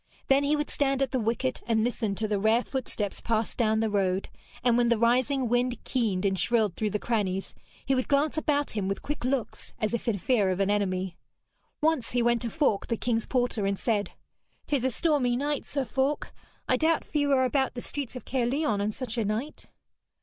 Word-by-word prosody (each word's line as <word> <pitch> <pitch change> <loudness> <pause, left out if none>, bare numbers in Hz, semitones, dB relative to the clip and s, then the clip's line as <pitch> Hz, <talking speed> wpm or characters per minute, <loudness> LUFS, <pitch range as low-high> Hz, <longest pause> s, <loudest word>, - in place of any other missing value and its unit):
Then 275 +1 +5
he 290 +1 +2
would 295 0 -2
stand 275 -1 +1
at 265 - -2
the 260 - 0
wicket 225 - -1
and 220 -2 +2
listen 225 -4 -1
to 215 +2 -2
the 205 -1 0
rare 220 +4 +3
footsteps 230 -6 -4
pass 225 -1 0
down 220 -2 +1
the 225 - +2
road, 190 -2 0 0.3
and 240 -1 +4
when 240 0 +3
the 235 - +3
rising 250 +3 +2
wind 245 +1 +1
keened 215 -7 0
and 190 -1 +1
shrilled 220 -6 +2
through 215 - -1
the 210 - -1
crannies, 200 -4 -1 0.3
he 270 - +2
would 255 -1 0
glance 290 +2 +2
about 290 -2 0
him 205 -3 -2
with 195 0 -3
quick 295 -2 -4
looks 255 -3 -2
as 215 +1 -1
if 235 - -2
in 220 -4 +1
fear 205 -1 +2
of 185 0 -1
an 200 +1 +2
enemy. 185 -3 -1 0.6
Once 305 -7 +1
he 245 -1 +2
went 235 -1 +2
to 235 - -2
Falk, 280 -8 +1
the 230 - -1
king's 230 -1 -1
porter, 245 -5 0
and 200 0 0
said: 205 -4 -1 0.5
''Tis 280 -4 0
a 260 - +2
stormy 260 -2 +1
night, 290 +2 -2
Sir 275 -2 -1
Falk. 265 +5 -1 0.3
I 255 - +3
doubt 320 +4 +2
few 290 -2 0
are 260 -1 +4
about 265 +1 0
the 245 - -4
streets 275 -2 -1
of 250 - -7
Caerleon 250 -3 0
on 210 +1 0
such 240 0 -4
a - - +1
night.' 220 +9 -3
240 Hz, 215 wpm, -28 LUFS, 210-270 Hz, 0.6 s, Then